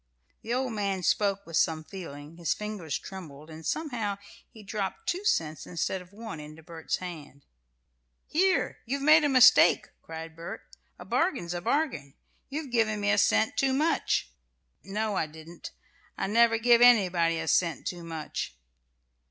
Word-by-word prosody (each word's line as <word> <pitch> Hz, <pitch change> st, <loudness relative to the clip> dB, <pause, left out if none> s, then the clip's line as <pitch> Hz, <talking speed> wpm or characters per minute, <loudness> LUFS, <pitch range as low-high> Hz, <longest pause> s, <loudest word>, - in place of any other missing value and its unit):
The 225 Hz, -, -6 dB
old 255 Hz, -1 st, 0 dB
man 200 Hz, -3 st, -2 dB
spoke 200 Hz, +3 st, +1 dB
with 165 Hz, -1 st, -2 dB
some 160 Hz, -1 st, +1 dB
feeling, 155 Hz, -4 st, -9 dB
his 170 Hz, -2 st, 0 dB
fingers 210 Hz, -9 st, -4 dB
trembled, 160 Hz, -5 st, -10 dB
and 160 Hz, +1 st, -10 dB
somehow 225 Hz, -, -2 dB, 0.3 s
he 220 Hz, -3 st, -14 dB
dropped 195 Hz, -2 st, -4 dB
two 365 Hz, +3 st, -1 dB
cents 160 Hz, -, 0 dB
instead 180 Hz, +2 st, -2 dB
of 180 Hz, 0 st, -16 dB
one 215 Hz, -5 st, -8 dB
into 155 Hz, +2 st, -11 dB
Bert's 165 Hz, 0 st, -3 dB
hand. 150 Hz, -6 st, -9 dB, 0.8 s
"Here! 375 Hz, +4 st, +1 dB
You've 275 Hz, +3 st, -2 dB
made 305 Hz, +1 st, +7 dB
a 290 Hz, -, +3 dB
mistake!" 255 Hz, -1 st, +6 dB
cried 160 Hz, 0 st, -8 dB
Bert. 165 Hz, +1 st, -7 dB, 0.4 s
"A 180 Hz, -, -11 dB
bargain's 245 Hz, -, 0 dB
a 175 Hz, -, -4 dB
bargain. 225 Hz, -, -1 dB, 0.3 s
You've 285 Hz, -1 st, -5 dB
given 220 Hz, -3 st, +1 dB
me 205 Hz, 0 st, +1 dB
a 205 Hz, -, +3 dB
cent 220 Hz, +2 st, +2 dB
too 270 Hz, -1 st, +2 dB
much." 290 Hz, -, +1 dB, 0.5 s
"No, 210 Hz, +2 st, -2 dB
I 160 Hz, -, 0 dB
didn't. 160 Hz, +2 st, -11 dB, 0.5 s
I -, -, -1 dB
never 225 Hz, +2 st, +4 dB
give 235 Hz, +1 st, +5 dB
anybody 180 Hz, -9 st, +5 dB
a -, -, -4 dB
cent 170 Hz, -4 st, +1 dB
too 175 Hz, -1 st, -4 dB
much." 160 Hz, -, -5 dB
195 Hz, 160 wpm, -28 LUFS, 165-235 Hz, 0.8 s, made